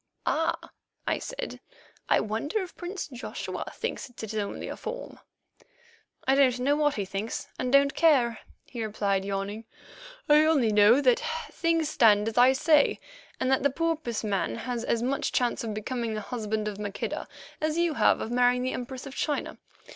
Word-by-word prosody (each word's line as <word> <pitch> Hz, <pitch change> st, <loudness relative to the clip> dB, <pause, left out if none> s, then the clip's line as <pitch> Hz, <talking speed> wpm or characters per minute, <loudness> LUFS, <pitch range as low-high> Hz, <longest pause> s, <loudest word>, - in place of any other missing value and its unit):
"Ah!" 325 Hz, +1 st, -1 dB, 0.3 s
I -, -, 0 dB
said. -, -, -6 dB, 0.5 s
"I -, -, +5 dB
wonder 255 Hz, -, -2 dB
if 365 Hz, -, -10 dB
Prince 365 Hz, +2 st, -5 dB
Joshua 255 Hz, -3 st, -6 dB
thinks -, -, -4 dB
it 220 Hz, -3 st, -7 dB
only 210 Hz, -2 st, -3 dB
a -, -, -5 dB
form?" -, -, -7 dB, 1.1 s
"Don't 265 Hz, -2 st, +4 dB
know 280 Hz, +3 st, +2 dB
what 295 Hz, -1 st, +2 dB
he 200 Hz, -, -2 dB
thinks, 195 Hz, +4 st, -4 dB
and 250 Hz, -, -1 dB
don't 280 Hz, 0 st, +5 dB
care," 260 Hz, -9 st, +3 dB, 0.3 s
he 235 Hz, -3 st, -5 dB
replied, 200 Hz, -2 st, 0 dB
yawning; 200 Hz, +3 st, -4 dB, 0.6 s
"I 300 Hz, +1 st, +6 dB
only 280 Hz, -9 st, +3 dB
know 210 Hz, +6 st, +6 dB
that 250 Hz, -3 st, +3 dB, 0.3 s
things 330 Hz, -2 st, +1 dB
stand 210 Hz, -2 st, +4 dB
as 225 Hz, -, -10 dB
I 255 Hz, +2 st, +7 dB
say, 300 Hz, +2 st, +3 dB, 0.4 s
and 260 Hz, -, +1 dB
that 265 Hz, -, +3 dB
the 280 Hz, -, +3 dB
porpoise 310 Hz, -6 st, -2 dB
man 195 Hz, -, -1 dB
has 240 Hz, -, -4 dB
as 235 Hz, -1 st, 0 dB
much 270 Hz, +2 st, -1 dB
chance 245 Hz, -1 st, +1 dB
of 220 Hz, -2 st, -4 dB
becoming 230 Hz, +1 st, -3 dB
the 215 Hz, -, -3 dB
husband 215 Hz, -2 st, -3 dB
of 205 Hz, -1 st, -5 dB
Maqueda 205 Hz, -1 st, -4 dB, 0.3 s
as 310 Hz, +1 st, 0 dB
you 340 Hz, -2 st, +2 dB
have -, -, +3 dB
of 225 Hz, -, -4 dB
marrying 250 Hz, 0 st, +3 dB
the 255 Hz, -, -1 dB
Empress 255 Hz, +2 st, -6 dB
of 275 Hz, -, -8 dB
China. 295 Hz, +1 st, -2 dB
250 Hz, 170 wpm, -27 LUFS, 215-295 Hz, 1.1 s, I